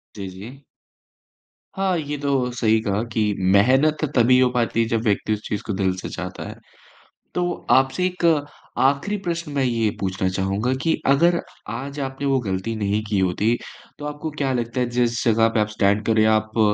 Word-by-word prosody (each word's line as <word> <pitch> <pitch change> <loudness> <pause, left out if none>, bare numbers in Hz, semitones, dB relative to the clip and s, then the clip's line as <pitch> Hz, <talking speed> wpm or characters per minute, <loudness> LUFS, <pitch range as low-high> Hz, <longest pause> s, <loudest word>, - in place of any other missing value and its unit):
जी, 100 -2 -6
जी। 110 +10 -11 1.1
हाँ, 190 -2 +1
ये 150 -2 -3
तो 135 -3 0
सही 110 -2 +2
कहा 100 -1 -1
कि 105 -2 +1 0.2
मेहनत 135 +10 +4
तभी 125 +1 +5
हो 130 -1 +4
पाती 115 -2 +1
है 115 - +1
जब 115 -1 0
व्यक्ति 110 -1 +1
उस 105 - -4
चीज़ 105 - -3
को 105 - -3
दिल 95 -1 0
से 95 - -6
चाहता 90 0 -6
है। - - -8 0.8
तो 180 - 0 0.3
आपसे 135 +8 +3
एक 180 -1 -4 0.5
आखिरी 140 +10 +2
प्रश्न 170 -2 -3
मैं 140 -2 +1
ये 115 -3 +1
पूछना 95 -1 -1
चाहूँगा 100 +6 -1
कि 165 - +2
अगर 170 +6 +4 0.3
आज 140 +4 -6
आपने 135 +1 -4
वो 135 -1 +3
गलती 95 0 -3
नहीं 105 0 0
की 105 -2 0
होती, 95 +5 +1 0.4
तो 145 - -8
आपको 150 +2 -5
क्या 135 -2 0
लगता 120 0 -2
है 125 - +1
जिस 120 -1 0
जगह 115 -1 +4
पे 110 - +3
आप 105 - +1
स्टैंड 105 0 +1
कर 110 - +3
रहीं 110 - +5
हैं 110 - +4
आप 110 +1 -1
115 Hz, 195 wpm, -22 LUFS, 105-140 Hz, 1.1 s, तभी